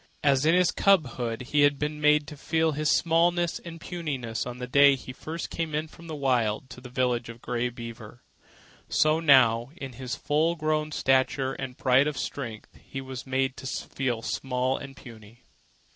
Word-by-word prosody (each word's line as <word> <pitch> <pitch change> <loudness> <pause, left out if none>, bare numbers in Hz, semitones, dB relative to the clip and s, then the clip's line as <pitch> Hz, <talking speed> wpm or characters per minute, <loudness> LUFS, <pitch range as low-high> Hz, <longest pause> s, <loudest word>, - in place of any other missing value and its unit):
As 140 0 +3
in 165 - +5
his 180 -1 +4
cubhood 130 - +1
he 150 - +4
had 145 -1 +4
been 150 +1 -3
made 150 0 +4
to 150 - -9
feel 160 +2 0
his 150 0 -1
smallness 170 +1 +2
and 165 -1 -9
puniness 135 -11 -4
on 125 0 -6
the 125 - -5
day 140 +2 +6
he 130 -1 -9
first 160 +5 -6
came 160 -3 -3
in 155 +1 -1
from 165 +2 -14
the 160 - -5
Wild 130 -3 0
to 125 - -10
the 125 - -10
village 125 -2 0
of 115 0 -9
Grey 125 0 -2
Beaver, 115 -1 -10 0.7
so 155 +1 +3
now, 125 -6 +5
in 135 -6 -7
his 125 +1 -5
full 160 +3 +1
grown 155 -1 -1
stature 130 -1 +1
and 130 -2 -6
pride 130 +2 +4
of 150 -3 -3
strength, 115 -6 -6
he 135 - -7
was 130 -2 -7
made 130 0 0
to 130 - -7
feel 130 -3 -3
small 130 0 -1
and 135 -1 -8
puny. 115 -1 -14
135 Hz, 185 wpm, -27 LUFS, 125-155 Hz, 0.7 s, day